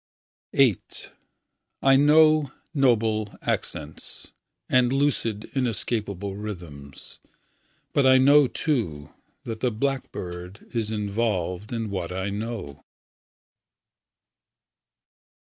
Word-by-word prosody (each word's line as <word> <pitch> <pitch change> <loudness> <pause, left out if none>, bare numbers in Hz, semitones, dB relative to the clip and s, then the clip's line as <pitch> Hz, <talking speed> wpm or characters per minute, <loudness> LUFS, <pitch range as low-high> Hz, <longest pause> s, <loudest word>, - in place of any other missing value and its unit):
VIII 130 -8 +4 1.0
I 135 0 +6
know 150 0 +5 0.2
noble 110 -6 +1
accents 75 +1 -4 0.4
And 125 -1 +3
lucid, 130 -6 0
inescapable 105 -6 -2
rythms; 85 -10 -9 0.7
But 140 -2 +4
I 130 0 +7
know, 140 +2 +6
too, 100 - -2 0.3
That 110 -1 -5
the 125 - +1
blackbird 100 -7 -4
is 115 -3 -1
involved 105 -3 -2
In 115 -3 -3
what 90 -3 -3
I 95 +2 -3
know. 105 - -5
110 Hz, 85 wpm, -25 LUFS, 95-130 Hz, 1.0 s, I